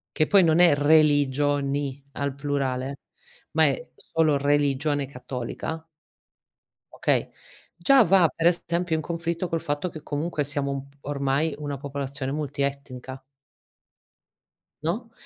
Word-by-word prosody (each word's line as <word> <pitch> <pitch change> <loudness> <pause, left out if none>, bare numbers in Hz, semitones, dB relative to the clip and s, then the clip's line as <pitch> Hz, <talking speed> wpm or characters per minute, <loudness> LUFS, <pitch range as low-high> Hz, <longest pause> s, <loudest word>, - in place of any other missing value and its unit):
che 155 - +3
poi 200 -2 +6
non 165 0 +4
è 175 -4 +7
religioni 145 -2 +2
al 140 -1 -3
plurale, 140 -2 -2 0.6
ma - - +4
è - - -2
solo 160 - +1
religione 145 0 +1
cattolica 135 +5 -6 1.1
okay? - - 0 0.5
Già 275 -2 +5
va 185 -4 +5
per 165 - 0
esempio 170 -1 +1
in 155 - -3
conflitto, 170 +2 -3
col 165 -1 -1
fatto 145 +4 -2
che 155 -3 -10
comunque 150 +1 -2
siamo 140 -1 -2
un 140 0 -5
p 140 - -25
ormai, 140 +2 0
una 145 -2 -4
popolazione 140 -1 -3
multietnica. 140 -3 -4 1.6
No? 215 +9 -2
145 Hz, 120 wpm, -25 LUFS, 140-165 Hz, 1.6 s, è